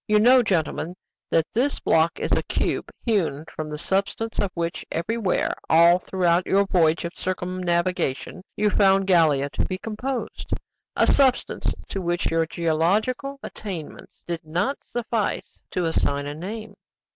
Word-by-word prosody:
"You 210 -1 +4
know, 250 +4 +7
gentlemen, 175 -4 -1 0.3
that 165 - +3
this 265 +5 +1
block 165 +1 +2
is - - -3
a - - +3
cube - - -2 0.2
hewn 170 - 0
from 155 -1 -4
the 150 - -5
substance 200 +6 -2
of 200 - +1
which 170 -1 -2
everywhere, 200 +3 0 0.2
all 170 +2 +6
throughout 180 -1 +1
your 200 +1 +3
voyage 170 -3 +2
of 170 - -5
circumnavigation, 180 -4 -1
you 210 0 +2
found 195 -1 +4
Gallia 155 -7 +3
to - - -1
be 185 - -3
composed 235 +5 -4 0.4
a - - +4
substance 265 -2 +2
to 195 - -3
which 175 0 -1
your 165 0 +2
geological 195 - 0
attainments 180 -8 -8
did 170 -1 -4
not 175 - -1
suffice 230 -3 -3
to 180 - -1
assign 145 -3 +1
a 145 - -4
name." 205 +6 -6
180 Hz, 145 wpm, -24 LUFS, 165-210 Hz, 0.4 s, know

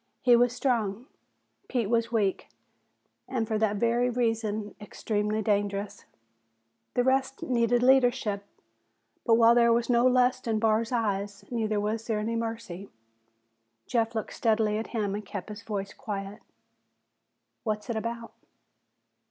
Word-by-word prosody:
He 245 -1 +6
was 245 0 +4
strong, 235 -4 -1 0.6
Pete 240 -5 0
was 230 +1 +1
weak 205 -5 0 0.8
and 240 -4 -2
for 215 -1 -1
that 215 -1 +1
very 235 +3 +2
reason 225 -3 -1
extremely 210 0 -2
dangerous. 205 -1 -1 0.9
The 245 - +3
rest 265 +1 0
needed 240 -1 +2
leadership. 245 -6 +3 0.8
But 225 - +6
while 230 0 +6
there 235 -1 +5
was 235 +1 +2
no 240 +1 +4
lust 255 0 +2
in 220 -1 +1
Barr's 225 +1 +1
eyes, 200 -4 -2
neither 220 -3 0
was 215 +2 -2
there 220 -2 0
any 220 +2 -2
mercy. 225 -5 -5 1.0
Jeff 230 -1 0
looked 220 - -3
steadily 215 -2 +1
at 225 - -5
him 210 -4 -2
and 210 +1 -4
kept 200 0 -7
his 210 +1 -7
voice 205 -3 -4
quiet. 200 -2 -6 1.2
"What's 215 -1 -2
it 235 - -2
about?" 230 +1 -4
225 Hz, 135 wpm, -28 LUFS, 210-235 Hz, 1.2 s, He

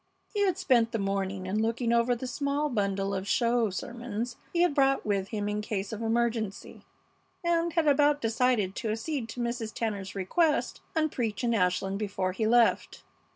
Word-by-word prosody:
He 410 -1 +2
had 365 -2 0
spent 250 -11 +2
the - - +1
morning 195 -1 -2
in 200 +3 0
looking 230 +1 0
over 235 +1 +3
the 240 - -6
small 280 +3 -1
bundle 200 -4 -1
of 190 0 -3
"show 235 0 +2
sermons" 235 +2 -5 0.2
he 345 0 +3
had 355 - +2
brought 275 -1 +2
with 200 -2 0
him 205 0 -3
in 210 0 -1
case 205 -1 -3
of 220 - -5
emergency, 225 -2 -1 0.6
and 340 0 +1
had 330 -2 +2
about 290 +1 +4
decided 225 -4 +1
to 225 - -2
accede 230 +2 -3
to 245 - -7
Mrs. 235 -2 -2
Tanner's 205 -5 -3
request 295 - +1
and 310 -2 +1
preach 230 -2 -2
in 235 -1 +2
Ashland 190 0 +1
before 195 -3 -1
he 215 +4 -1
left. 235 0 +2
230 Hz, 180 wpm, -28 LUFS, 205-260 Hz, 0.6 s, about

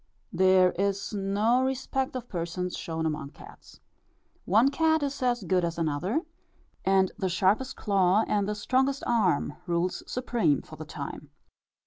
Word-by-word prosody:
There 185 0 +5
is 200 +1 -1
no 205 +5 +1
respect 265 0 -2
of 250 -1 -5
persons 175 0 -3
shown 160 -1 -4
among 150 -3 -3
cats. - - -15 0.6
One 225 +9 +4
cat 315 0 +2
is 280 -1 -3
as 240 -3 +1
good 185 0 +1
as 170 -1 -2
another; 165 - 0 0.6
and 190 0 +3
the 190 -3 0
sharpest 195 +8 +1
claw 195 0 +2
and 205 -1 0
the 210 - -1
strongest 265 +6 0
arm 185 -11 +1
rules 175 +1 -1
supreme 235 - +1
for - - -12
the - - -8
time. - - -7
195 Hz, 145 wpm, -27 LUFS, 180-245 Hz, 0.6 s, There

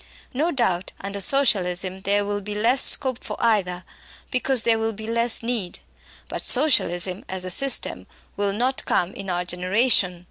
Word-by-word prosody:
No 300 +7 0
doubt, 190 - -1
under 200 +1 -5
Socialism, 190 -7 +2
there 200 +1 +1
will 205 0 -3
be 205 +1 -6
less 235 +5 +2
scope 260 -3 +3
for - - -6
either, 190 -6 0 0.5
because 255 -1 +1
there 225 -1 +2
will 225 0 -2
be 220 +1 -9
less 230 +1 +1
need. 230 -7 -3 0.5
But - - -5
Socialism, 190 - +1
as 185 -1 -3
a 185 - -4
system, 275 +8 +1 0.3
will 200 0 -1
not 250 +6 -1
come 180 +2 0
in 195 -1 -8
our 175 0 -2
generation. 180 +1 +1
205 Hz, 165 wpm, -23 LUFS, 185-240 Hz, 0.5 s, scope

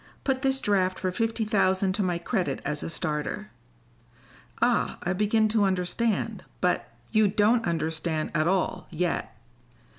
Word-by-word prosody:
Put 265 -1 0
this 270 -1 +2
draft 190 -4 +1
for 185 -1 -1
fifty 225 +3 -1
thousand 190 -3 +2
to 205 - -1
my 180 -3 0
credit 170 - -1
as 150 0 -2
a - - -4
starter." 150 -2 -3 1.1
"Ah, - - +2
I 175 - 0
begin 210 +3 +2
to 215 -1 +2
understand. 195 +4 0 0.2
But - - 0
" - - -32
"You 215 -2 +4
don't 215 +3 +3
understand 160 -1 -1
at 155 0 +2
all, 185 0 0
yet. 170 -7 -2
185 Hz, 150 wpm, -27 LUFS, 170-215 Hz, 1.1 s, You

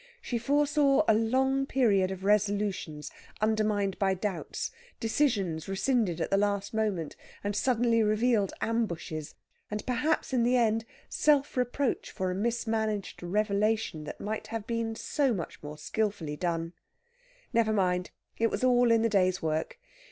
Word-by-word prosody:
She 240 - -3
foresaw 285 +2 +3
a 220 - +6
long 265 +5 +2
period 205 -9 +3
of 190 0 -6
resolutions 200 -6 0 0.3
undermined 215 -2 +1
by 195 -1 +2
doubts, 190 0 -3 0.3
decisions 215 - 0
rescinded 195 -3 +1
at - - -2
the 195 - +4
last 200 0 0
moment, 205 -8 -1 0.3
and 205 0 -2
suddenly 235 -1 +2
revealed 215 -1 +2
ambushes, 170 -9 -2 0.3
and 210 0 -4
perhaps 260 +4 0
in 250 - +3
the 245 +2 +3
end 225 -1 +2 0.2
self 290 -2 +2
reproach 250 +2 -1
for 185 -1 -2
a - - -1
mismanaged 220 -1 -1
revelation 205 -2 0
that - - -7
might 215 +1 -4
have 225 -2 -4
been 230 -1 -2
so 270 +1 0
much 170 - -6
more 150 0 -8
skilfully 195 -3 -2
done. 165 +1 -2 0.8
Never 225 -2 +3
mind 180 -3 +1 0.3
it 230 0 +3
was - - -3
all 245 -1 +4
in 225 -1 +4
the - - +4
day's 185 -3 +2
work! 155 0 -1
215 Hz, 145 wpm, -29 LUFS, 190-235 Hz, 0.8 s, a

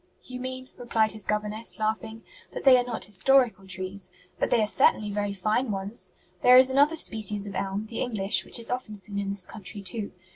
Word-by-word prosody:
"You 250 0 -8
mean," 255 0 -5
replied 225 -3 +1
his 215 -2 -5
governess, 210 +1 -1
laughing, 220 +1 -2 0.3
"that - - -5
they 265 -2 +8
are - - +1
not 240 -5 -4
historical 205 0 +3
trees; 185 +1 -3 0.3
but - - +1
they 235 - +3
are - - 0
certainly 210 0 +3
very 205 0 -1
fine 215 +6 0
ones. 195 -1 -3 0.3
There 250 0 +8
is 260 +1 +6
another 285 +4 +4
species 210 -8 -2
of 200 - -6
elm, 195 +2 -2
the 220 +1 -6
English, 210 -4 +1
which - - -2
is 235 0 -6
often 250 -4 -3
seen 200 0 -6
in 200 -1 -2
this 200 -2 -1
country 205 -1 -7
too. 200 +2 -3
215 Hz, 205 wpm, -27 LUFS, 200-245 Hz, 0.3 s, they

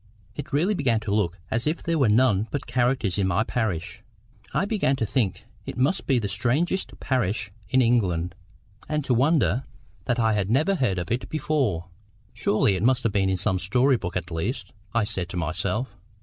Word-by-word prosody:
It 155 - -6
really 165 +9 +2
began 130 - +1
to 105 -2 -2
look 95 -4 0
as 115 +5 0
if 155 +3 -1
there 165 -1 0
were 130 -6 +4
none 110 -2 +3
but 145 - -3
characters 120 -6 +1
in 95 - +2
my 95 +4 +2
parish. 105 -8 -2 0.5
I - - +1
began 200 -10 +1
to 120 - -1
think 105 -3 -1 0.2
it - - -5
must 140 +10 +1
be 135 - +3
the 110 -4 0
strangest 125 - -1
parish 110 -5 -1 0.2
in 130 +2 +4
England, 90 -8 +1 0.6
and 150 -2 -1
to 125 - +2
wonder 130 - +2 0.4
that 125 - 0
I 110 -2 +2
had 100 -2 0
never 150 - +3
heard 125 - 0
of 90 +2 -4
it 120 +2 -2
before. 130 - -1 0.4
"Surely 105 0 +2
it 95 - -2
must 125 -1 +2
be 100 - +1
in 95 -1 +1
some 95 +1 +1
story 125 +9 +3
book 90 -6 -3
at 85 -1 -5
least!" 95 +4 -3 0.2
I 115 -1 +2
said 95 -4 -2
to 90 - -5
myself. 90 - -2
115 Hz, 190 wpm, -25 LUFS, 95-130 Hz, 0.6 s, were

